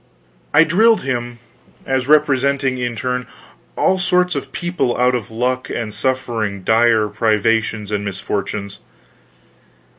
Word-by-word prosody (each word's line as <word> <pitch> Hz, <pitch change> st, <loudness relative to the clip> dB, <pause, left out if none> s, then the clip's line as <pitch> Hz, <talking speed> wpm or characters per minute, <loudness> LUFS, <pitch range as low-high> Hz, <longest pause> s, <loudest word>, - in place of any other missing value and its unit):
I 155 Hz, +2 st, +6 dB
drilled 220 Hz, +8 st, +3 dB
him 120 Hz, -2 st, -3 dB, 0.5 s
as 130 Hz, -1 st, -1 dB
representing 140 Hz, -3 st, +2 dB
in 120 Hz, -1 st, -2 dB
turn 125 Hz, +1 st, -3 dB, 0.5 s
all 190 Hz, -, +2 dB
sorts 180 Hz, -1 st, +2 dB
of 140 Hz, -, -5 dB
people 175 Hz, -8 st, -2 dB
out 125 Hz, +1 st, +3 dB
of 120 Hz, -5 st, -3 dB
luck 125 Hz, +3 st, -2 dB
and 110 Hz, -3 st, -4 dB
suffering 115 Hz, -6 st, -2 dB
dire 110 Hz, 0 st, +3 dB
privations 110 Hz, 0 st, 0 dB
and 105 Hz, -1 st, -1 dB
misfortunes. 100 Hz, 0 st, -4 dB
125 Hz, 120 wpm, -18 LUFS, 110-140 Hz, 0.5 s, I